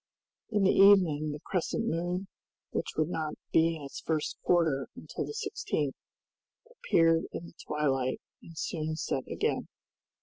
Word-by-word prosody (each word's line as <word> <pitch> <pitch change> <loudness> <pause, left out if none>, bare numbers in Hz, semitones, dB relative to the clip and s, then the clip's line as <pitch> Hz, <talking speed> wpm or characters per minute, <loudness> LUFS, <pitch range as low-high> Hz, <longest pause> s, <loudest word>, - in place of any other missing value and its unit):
In 210 -3 +2
the 190 - +5
evening 175 -7 +6
the 150 - -5
crescent 185 +5 -1
moon, 180 0 -1 0.4
which - - -2
would 155 +1 +2
not 155 -3 -2 0.2
be 165 0 +4
in 155 - -8
its 140 - -7
first 155 -2 -1
quarter 160 -6 +2
until - - -5
the 445 +1 -4 0.2
16th, - - +1 0.8
appeared 165 - +3
in 170 - -5
the - - -12
twilight 135 -4 0 0.2
and 165 -1 -13
soon 155 -1 -2
set 135 -4 -2
again. - - -1
165 Hz, 145 wpm, -30 LUFS, 150-180 Hz, 0.8 s, evening